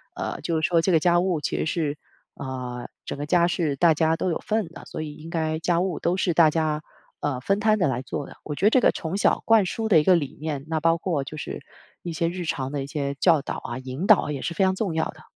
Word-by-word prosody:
呃， -, -, -4 dB
就 160 Hz, 0 st, -1 dB
是 -, -, +2 dB
说 170 Hz, -1 st, +3 dB
这 185 Hz, +2 st, +1 dB
个 160 Hz, -, +4 dB
家 175 Hz, 0 st, +4 dB
务 175 Hz, -3 st, 0 dB
其 -, -, -2 dB
实 -, -, -1 dB
是， 155 Hz, -2 st, -1 dB, 0.4 s
呃， 125 Hz, -2 st, -5 dB, 0.2 s
整 -, -, -5 dB
个 145 Hz, -, -4 dB
家 170 Hz, +3 st, +3 dB
是 165 Hz, -4 st, 0 dB
大 165 Hz, +3 st, +4 dB
家 160 Hz, +1 st, +2 dB
都 185 Hz, -, -1 dB
有 165 Hz, -, -1 dB
份 215 Hz, -6 st, -1 dB
的， 165 Hz, 0 st, -12 dB
所 -, -, -6 dB
以 150 Hz, -1 st, -6 dB
应 160 Hz, +2 st, -10 dB
该 160 Hz, -2 st, -1 dB
家 170 Hz, +1 st, +1 dB
务 185 Hz, -2 st, -2 dB
都 175 Hz, -, +1 dB
是 180 Hz, -2 st, +1 dB
大 160 Hz, -2 st, +6 dB
家， 155 Hz, -1 st, 0 dB, 0.4 s
呃， 140 Hz, -4 st, -2 dB
分 195 Hz, +9 st, +1 dB
摊 215 Hz, 0 st, +3 dB
地 180 Hz, -6 st, +2 dB
来 125 Hz, -1 st, -2 dB
做 135 Hz, +2 st, -5 dB
的。 -, -, -13 dB
我 150 Hz, -, -5 dB
觉 165 Hz, +8 st, -1 dB
得 -, -, +8 dB
这 255 Hz, -, +4 dB
个 -, -, +4 dB
从 165 Hz, +4 st, -4 dB
小 -, -, +2 dB
灌 225 Hz, -3 st, +5 dB
输 220 Hz, +4 st, -3 dB
的 170 Hz, -7 st, +7 dB
一 -, -, +1 dB
个 185 Hz, -, +6 dB
理 145 Hz, -5 st, -2 dB
念， 150 Hz, -3 st, -3 dB
那 160 Hz, -1 st, 0 dB
包 165 Hz, +1 st, +3 dB
括 165 Hz, -5 st, -1 dB
就 155 Hz, +3 st, -8 dB
是 -, -, -6 dB, 0.4 s
一 170 Hz, -, -4 dB
些 165 Hz, +1 st, 0 dB
日 175 Hz, +1 st, -4 dB
常 135 Hz, -4 st, -2 dB
的 140 Hz, -, -2 dB
一 135 Hz, -, -7 dB
些 140 Hz, -1 st, -3 dB
教 160 Hz, +1 st, +4 dB
导 -, -, -5 dB
啊、 120 Hz, -, -5 dB
引 130 Hz, +6 st, -5 dB
导 215 Hz, -3 st, +8 dB
啊， -, -, -3 dB
也 135 Hz, -, -5 dB
是 170 Hz, -, -3 dB
非 180 Hz, -, +1 dB
常 190 Hz, 0 st, +2 dB
重 190 Hz, -3 st, -2 dB
要 160 Hz, -, +1 dB
的。 -, -, -8 dB
160 Hz, 305 characters per minute, -25 LUFS, 145-180 Hz, 0.4 s, 得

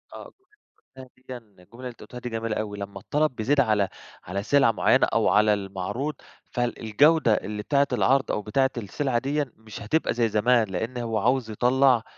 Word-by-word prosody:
آه، -, -, -10 dB, 0.7 s
الجملة 130 Hz, -1 st, -11 dB, 0.2 s
ديًّا 130 Hz, -, -5 dB
الجملة 105 Hz, -4 st, -21 dB
اللي 130 Hz, -1 st, -5 dB
أنت 120 Hz, -, -14 dB
قلتها 125 Hz, -, -9 dB
دي 125 Hz, -, -6 dB
جميلة 115 Hz, -1 st, -3 dB
أوي، 105 Hz, -1 st, -4 dB
لمّا 100 Hz, -1 st, -7 dB
الطلب 150 Hz, +7 st, -1 dB
بيزيد 130 Hz, +6 st, +1 dB
على 105 Hz, -6 st, +2 dB, 0.3 s
على 100 Hz, +3 st, -4 dB
سلعة 140 Hz, 0 st, +4 dB
معينة 110 Hz, -, +3 dB
أو -, -, +3 dB
على 105 Hz, +3 st, +4 dB
المعروض، 105 Hz, +8 st, -4 dB, 0.4 s
فالجودة 120 Hz, +3 st, +2 dB
اللي 105 Hz, +1 st, -3 dB
بتاعة 140 Hz, +4 st, +2 dB
العرض 130 Hz, +2 st, +2 dB
أو -, -, -1 dB
بتاعة 135 Hz, +6 st, +1 dB
السلعة 120 Hz, +3 st, -1 dB
ديًّا 140 Hz, 0 st, -2 dB
مش 110 Hz, 0 st, -11 dB
هتبقى 135 Hz, +10 st, 0 dB
زي 115 Hz, -1 st, +1 dB
زمان، 110 Hz, +2 st, +2 dB
لأن 110 Hz, +7 st, -4 dB
هو 115 Hz, -2 st, -2 dB
عاوز 120 Hz, +1 st, 0 dB
يطلّع 125 Hz, +1 st, +3 dB
115 Hz, 175 wpm, -25 LUFS, 105-130 Hz, 0.7 s, سلعة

